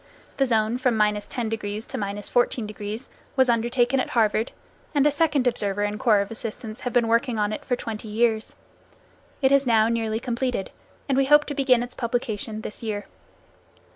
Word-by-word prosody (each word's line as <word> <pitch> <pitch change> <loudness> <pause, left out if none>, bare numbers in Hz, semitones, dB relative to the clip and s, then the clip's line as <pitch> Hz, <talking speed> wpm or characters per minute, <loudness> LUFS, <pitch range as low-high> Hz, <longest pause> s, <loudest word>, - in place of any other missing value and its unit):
The 270 - +2
zone 225 0 +1
from 250 -3 +1
10° 210 -1 +3
to 220 -3 -4
14° 210 +2 -2 0.3
was 260 -2 +4
undertaken 240 +3 +1
at - - -1
Harvard, 220 0 +1 0.4
and 285 -1 +4
a 295 - +5
second 290 -3 +1
observer 205 -4 0
and 205 0 -2
corps 215 -3 +4
of 200 - -5
assistants 220 0 -6
have 245 - -3
been 240 -2 +2
working 230 +1 +1
on 210 0 0
it - - -5
for 250 - 0
twenty 225 -2 -6
years. 220 0 0 0.9
It 265 - +5
is 275 -1 +4
now 225 -1 +4
nearly 225 -1 -1
completed, 245 -3 -2 0.4
and 275 - +1
we 275 - +3
hope 295 +2 +6
to 290 - -4
begin 260 -4 +3
its 245 - -8
publication 230 -3 -3
this 210 - -6
year. 210 -3 -3
230 Hz, 170 wpm, -24 LUFS, 215-250 Hz, 0.9 s, hope